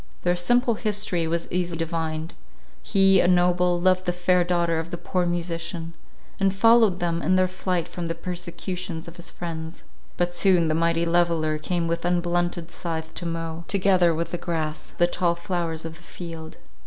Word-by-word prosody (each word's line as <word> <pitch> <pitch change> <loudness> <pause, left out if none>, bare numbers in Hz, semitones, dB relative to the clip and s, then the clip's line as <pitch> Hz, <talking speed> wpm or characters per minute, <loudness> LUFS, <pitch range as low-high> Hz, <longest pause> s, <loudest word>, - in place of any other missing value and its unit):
Their 175 - +2
simple 240 +7 +2
history 205 -6 -1
was 170 +1 -1
easily 175 -1 -1
divined. 160 -1 -3 0.5
He, 195 -1 +4
a - - +4
noble, 180 0 +3
loved 185 +1 +2
the 180 - +1
fair 180 0 +2
daughter 170 -2 +1
of 165 +1 -5
the 175 - -4
poor 180 0 -1
musician, 170 -1 -3 0.5
and 195 0 +2
followed 225 -2 +5
them 170 -1 -1
in 185 +4 +2
their 185 0 +4
flight 185 -2 -2
from 175 -1 -5
the 165 - -2
persecutions 175 0 -5
of 170 +1 -10
his 175 - -5
friends; 165 -1 -6 0.3
but 175 0 0
soon 175 -3 +4
the - - +2
mighty 165 +1 +2
leveller 165 -2 +1
came 170 +2 -1
with 170 0 -1
unblunted 175 -1 0
scythe 160 -2 -4
to 175 - -5
mow, 165 0 -4
together 185 -4 +3
with 170 +1 -3
the 175 - -3
grass, 160 -3 -3
the 175 - +2
tall 175 0 +1
flowers 170 -3 -3
of 160 0 -7
the - - -18
field. 165 -2 -8
175 Hz, 180 wpm, -25 LUFS, 165-180 Hz, 0.5 s, followed